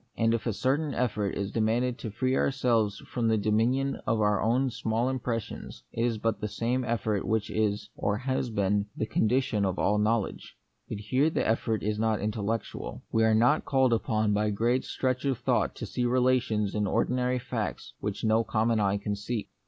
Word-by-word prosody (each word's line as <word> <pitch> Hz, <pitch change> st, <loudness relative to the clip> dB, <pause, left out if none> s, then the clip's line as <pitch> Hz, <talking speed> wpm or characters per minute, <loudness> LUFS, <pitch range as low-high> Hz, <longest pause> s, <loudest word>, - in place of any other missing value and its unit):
And 115 Hz, 0 st, +3 dB
if 115 Hz, 0 st, -1 dB
a 115 Hz, -, +1 dB
certain 140 Hz, +7 st, 0 dB
effort 110 Hz, -5 st, -1 dB
is 100 Hz, 0 st, -3 dB
de -, -, -2 dB
manded 120 Hz, +3 st, +1 dB
to 115 Hz, -, -5 dB
free 130 Hz, +5 st, 0 dB
ourselves 115 Hz, -7 st, +1 dB
from 120 Hz, -2 st, -1 dB
the 110 Hz, -1 st, +3 dB
dominion 115 Hz, +6 st, +1 dB
of 115 Hz, -, +2 dB
our 105 Hz, -2 st, +2 dB
own 120 Hz, +4 st, +2 dB
too 135 Hz, -, 0 dB
small 115 Hz, +2 st, -1 dB
impressions, 120 Hz, -4 st, -4 dB
it 115 Hz, -, -2 dB
is 120 Hz, -2 st, +1 dB
but 110 Hz, -1 st, -1 dB
the 105 Hz, -, -1 dB
same 115 Hz, +5 st, -1 dB
effort 110 Hz, -4 st, -1 dB
which 110 Hz, -1 st, -1 dB
is, 105 Hz, 0 st, -1 dB
or 100 Hz, 0 st, 0 dB
has 130 Hz, +1 st, -1 dB
been, 100 Hz, -1 st, +1 dB
the -, -, 0 dB
condi 125 Hz, +4 st, +2 dB
tion 110 Hz, -6 st, -1 dB
of 95 Hz, -1 st, 0 dB
all 105 Hz, +1 st, +2 dB
knowledge. 110 Hz, 0 st, -1 dB, 0.3 s
But -, -, -3 dB
here 130 Hz, +8 st, +2 dB
the -, -, -1 dB
effort 110 Hz, -1 st, 0 dB
is 105 Hz, +1 st, -1 dB
not 110 Hz, -1 st, +1 dB
intellectual. 110 Hz, +1 st, -3 dB
We 110 Hz, -, +3 dB
are 110 Hz, -1 st, +4 dB
not 120 Hz, +7 st, +4 dB
called 130 Hz, -3 st, +3 dB
upon 110 Hz, -2 st, +1 dB
by 105 Hz, +1 st, +1 dB
great 120 Hz, +5 st, +1 dB
stretch 130 Hz, -1 st, -1 dB
of 135 Hz, -3 st, +1 dB
thought -, -, 0 dB
to -, -, -5 dB
see 125 Hz, -, -2 dB
relations 125 Hz, -4 st, +2 dB
in 105 Hz, -1 st, 0 dB
ordinary 125 Hz, +5 st, +1 dB
facts 125 Hz, -, -4 dB
which 105 Hz, -1 st, -4 dB
no 110 Hz, +1 st, +3 dB
common 110 Hz, 0 st, +1 dB
eye 100 Hz, -1 st, +2 dB
can 105 Hz, 0 st, -3 dB
see. 105 Hz, +2 st, -4 dB
110 Hz, 200 wpm, -28 LUFS, 105-125 Hz, 0.3 s, are